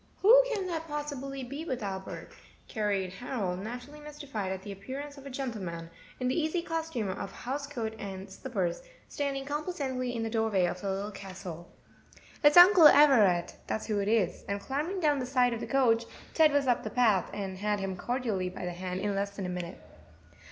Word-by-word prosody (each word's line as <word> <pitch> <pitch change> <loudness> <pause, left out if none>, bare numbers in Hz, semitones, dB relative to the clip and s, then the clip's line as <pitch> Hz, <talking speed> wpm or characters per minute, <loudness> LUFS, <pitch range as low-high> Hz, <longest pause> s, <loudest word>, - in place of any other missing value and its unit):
"Who - - +9
can 405 -5 -1
that 330 -2 -3
possibly 280 -3 -4
be 280 +5 -6
with 260 -8 -3
Albert?" 190 -1 -5 0.4
queried 200 -4 -1
Harold, 195 -5 -3
naturally 245 +8 -7
mystified 290 -10 -5
at 190 0 -5
the 205 - -7
appearance 265 +9 -7
of 280 -1 -11
a - - -6
gentleman, 195 -11 -5 0.3
in 255 - 0
the 255 - +1
easy 330 +2 0
costume 325 - -2
of 195 +1 -4
house 280 +6 -4
coat 230 -6 -4
and 195 -1 -6
slippers, 190 -4 -3 0.3
standing 275 -1 -3
complacently 275 -5 -3
in 230 - -2
the 225 - -2
doorway 220 -5 +2
of 180 +1 -3
the 200 - -2
Little 195 +2 -2
Castle. 185 -4 -8 0.7
"It's 295 +3 +6
Uncle 355 -2 +10
Everett, 230 -13 +5
that's 220 - -2
who 210 -2 0
it 200 - -1
is;" 210 -5 +1
and 200 0 -1
clambering 305 - -3
down 295 -3 +3
the 250 - -3
side 250 -2 +3
of 230 - -3
the - - -5
coach, 235 -4 +3 0.3
Ted 315 -2 +5
was 285 -1 +2
up 245 -2 +2
the 215 - -3
path, 215 -4 +3
and 190 -2 -5
had 210 0 0
him 195 -1 -3
cordially 220 -3 -2
by 180 - -7
the 180 - -2
hand 185 +1 -4
in 205 0 0
less 200 +1 -1
than 195 - -4
a - - -3
minute. 180 -1 -5
235 Hz, 195 wpm, -30 LUFS, 195-285 Hz, 0.7 s, Uncle